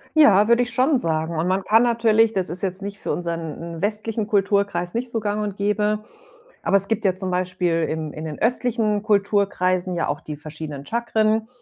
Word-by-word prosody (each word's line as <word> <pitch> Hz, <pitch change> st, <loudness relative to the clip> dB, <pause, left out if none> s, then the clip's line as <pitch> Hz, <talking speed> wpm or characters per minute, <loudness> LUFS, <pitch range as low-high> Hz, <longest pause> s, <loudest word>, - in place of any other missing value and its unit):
Ja, 210 Hz, -10 st, +6 dB
würde 235 Hz, +1 st, +4 dB
ich 245 Hz, 0 st, -6 dB
schon 260 Hz, +3 st, +3 dB
sagen 160 Hz, -1 st, -1 dB
und 165 Hz, -, 0 dB
man 190 Hz, +1 st, 0 dB
kann 225 Hz, +4 st, +4 dB
natürlich 225 Hz, -2 st, +3 dB
das 190 Hz, -5 st, -1 dB
ist 175 Hz, +4 st, -5 dB
jetzt 190 Hz, 0 st, -2 dB
nicht 200 Hz, 0 st, -6 dB
für -, -, -3 dB
unseren 165 Hz, -3 st, -4 dB
n 165 Hz, -, -8 dB
westlichen 215 Hz, +1 st, -1 dB
Kulturkreis 200 Hz, -4 st, +1 dB
nicht 240 Hz, +2 st, -2 dB
so 230 Hz, -, -1 dB
Gang 210 Hz, 0 st, -2 dB
und 205 Hz, -1 st, -4 dB
Gäbe, 210 Hz, +1 st, +1 dB, 0.6 s
aber 200 Hz, -, +3 dB
es 195 Hz, 0 st, +2 dB
gibt 225 Hz, -1 st, -1 dB
ja 190 Hz, -2 st, +3 dB
zum 190 Hz, -1 st, -2 dB
Beispiel 180 Hz, -2 st, 0 dB
im 155 Hz, -1 st, -3 dB
in 155 Hz, -, -7 dB
den 155 Hz, -2 st, -6 dB
östlichen 225 Hz, -3 st, +1 dB
Kulturkreisen 195 Hz, -3 st, +1 dB
ja 170 Hz, -, -1 dB
auch 145 Hz, +1 st, -2 dB
die 150 Hz, -1 st, -7 dB
verschiedenen 150 Hz, -2 st, -8 dB
Chakren 220 Hz, -1 st, 0 dB
200 Hz, 200 wpm, -22 LUFS, 175-220 Hz, 0.6 s, Ja